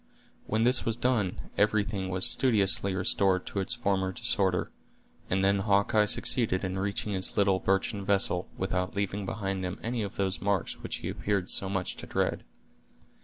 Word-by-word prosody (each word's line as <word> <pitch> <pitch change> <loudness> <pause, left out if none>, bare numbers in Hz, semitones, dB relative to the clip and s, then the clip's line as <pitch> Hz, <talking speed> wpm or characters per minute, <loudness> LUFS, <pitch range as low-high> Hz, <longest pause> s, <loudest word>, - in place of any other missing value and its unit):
When 110 +1 0
this 125 +1 +5
was 115 0 -1
done, 120 -7 -1
everything 105 -2 +1
was 95 0 -1
studiously 100 +1 +3
restored 95 -1 +2
to 100 - -4
its 95 +5 -2
former 95 -5 -1
disorder; 95 0 0 0.6
and 95 +1 +1
then 100 0 +3
Hawkeye 100 +1 +2
succeeded 105 -4 +2
in 95 0 -3
reaching 100 +1 -3
his 95 +2 -2
little 100 -2 +3
birchen 95 +2 -1
vessel, 95 -3 +1
without 90 0 -2
leaving 100 0 -2
behind 95 -3 -3
him 90 +1 -4
any 115 0 -2
of 100 -2 -5
those 95 -1 0
marks 100 -3 -1
which - - -4
he - - -2
appeared 100 -3 -2
so 95 - +2
much 95 -2 -3
to - - -9
dread. - - -1
100 Hz, 170 wpm, -28 LUFS, 95-105 Hz, 0.6 s, this